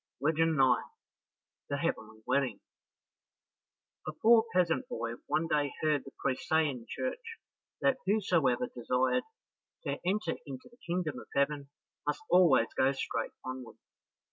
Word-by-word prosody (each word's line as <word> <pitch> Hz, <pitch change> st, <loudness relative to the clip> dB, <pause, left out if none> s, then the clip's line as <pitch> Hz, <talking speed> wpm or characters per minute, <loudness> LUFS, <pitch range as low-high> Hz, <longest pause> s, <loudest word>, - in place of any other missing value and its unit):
Legend 160 Hz, +3 st, +2 dB
9 130 Hz, -2 st, +5 dB, 0.9 s
The -, -, 0 dB
Heavenly 110 Hz, 0 st, -3 dB
Wedding 130 Hz, -7 st, +1 dB, 1.5 s
A -, -, -1 dB
poor 225 Hz, +7 st, +5 dB
peasant 180 Hz, +7 st, +2 dB
boy 120 Hz, -, -3 dB, 0.2 s
one 165 Hz, -, +1 dB
day 145 Hz, -3 st, +1 dB
heard 150 Hz, -2 st, +2 dB
the 135 Hz, -, -10 dB
priest 130 Hz, -, -2 dB
say 160 Hz, 0 st, +4 dB
in 125 Hz, -5 st, -5 dB
church 455 Hz, -, -4 dB, 0.4 s
that 265 Hz, -1 st, +3 dB
whosoever 170 Hz, -, +2 dB
desired 125 Hz, -, 0 dB, 0.6 s
to -, -, -2 dB
enter 185 Hz, -1 st, 0 dB
into 130 Hz, -2 st, -8 dB
the 240 Hz, -, -22 dB
kingdom 170 Hz, -3 st, -1 dB
of -, -, -12 dB
heaven 140 Hz, 0 st, +1 dB, 0.4 s
must 150 Hz, -, -1 dB
always 170 Hz, -10 st, +6 dB
go 135 Hz, +1 st, +4 dB
straight 135 Hz, -, -3 dB
onward. 130 Hz, -2 st, -6 dB
150 Hz, 135 wpm, -31 LUFS, 130-180 Hz, 1.5 s, always